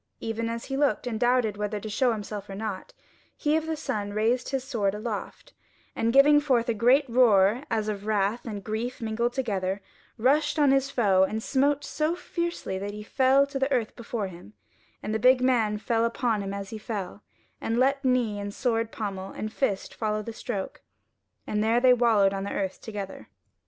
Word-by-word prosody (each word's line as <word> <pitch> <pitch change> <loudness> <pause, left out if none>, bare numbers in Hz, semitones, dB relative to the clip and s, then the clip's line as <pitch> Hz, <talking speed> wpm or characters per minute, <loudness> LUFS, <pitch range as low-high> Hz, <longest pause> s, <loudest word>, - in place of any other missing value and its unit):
Even 230 0 -3
as 230 0 -4
he 270 - -4
looked 285 -1 +1
and 225 -3 -3
doubted 240 -4 +2
whether 210 0 -2
to 215 - -7
show 240 +4 +2
himself 210 -2 -5
or 195 - -6
not, 205 -2 -5 0.5
he 300 +1 +1
of 320 0 -1
the 320 - -1
sun 205 -6 -3
raised 225 +4 +1
his 270 -2 -2
sword 215 -7 -1
aloft, 210 0 -6 0.4
and 230 +1 +1
giving 285 +3 +7
forth 255 -5 +1
a 235 - +1
great 250 +7 +4
roar 230 -2 +4
as 215 -1 -1
of 205 -1 -4
wrath 210 +2 +1
and 205 -4 -5
grief 225 +4 -3
mingled 235 +2 -1
together, 200 -7 -1 0.4
rushed 290 +7 +2
on 290 -3 +4
his 270 0 +2
foe 205 -8 +3
and 215 +3 +1
smote 285 +2 +1
so 310 +2 -1
fiercely 340 - -3
that 205 +1 -5
he 210 - -7
fell 265 +4 +3
to 280 -1 -5
the 270 +1 0
earth 240 -5 0
before 235 -3 -4
him, 170 - -10 0.5
and 215 - -3
the 220 - 0
big 255 +3 +5
man 235 -5 +2
fell 225 +2 0
upon 230 -2 0
him 195 0 -4
as 200 0 -6
he 220 - -6
fell, 205 -2 -5 0.4
and 230 - -1
let 275 +2 +2
knee 245 -5 +1
and 200 0 -5
sword 230 -2 0
pommel 195 -3 -5
and 215 +2 -6
fist 200 -8 -1
follow 215 -1 -2
the 230 - -6
stroke, 210 -4 -5 0.6
and 210 0 -1
there 225 +2 +3
they 250 0 +6
wallowed 220 -5 +3
on 195 0 -3
the 200 - -4
earth 190 -1 -3
together. 205 -3 -7
225 Hz, 200 wpm, -27 LUFS, 205-255 Hz, 0.6 s, giving